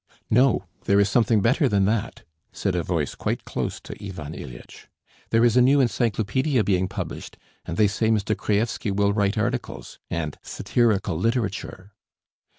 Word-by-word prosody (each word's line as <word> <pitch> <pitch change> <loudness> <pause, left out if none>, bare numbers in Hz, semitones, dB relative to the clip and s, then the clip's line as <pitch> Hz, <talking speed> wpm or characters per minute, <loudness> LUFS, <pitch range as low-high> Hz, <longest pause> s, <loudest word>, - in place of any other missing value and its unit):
"No, 120 -3 +3 0.2
there 100 0 +4
is 100 0 +3
something 110 0 +3
better 130 +6 +3
than 100 -3 +2
that," 105 +1 -1 0.3
said 95 - -2
a 90 - 0
voice 80 -4 -2
quite - - -3
close - - -3
to - - -8
Ivan 80 -7 -6
Ilyitch. - - -10 0.4
"There 115 +1 +4
is 120 - +3
a 125 - +6
new 135 +3 +5
encyclopædia 120 0 +1
being 95 -2 +1
published, - - -6 0.3
and 85 -1 -5
they 105 - +5
say 110 +2 0
Mr. 110 -1 +1
Kraevsky 110 +1 -1
will 100 +1 +2
write 100 +1 +1
articles... 115 - -3
and 80 -3 -3
satirical 105 -8 0
literature." 100 -3 -2
105 Hz, 155 wpm, -24 LUFS, 95-115 Hz, 0.4 s, a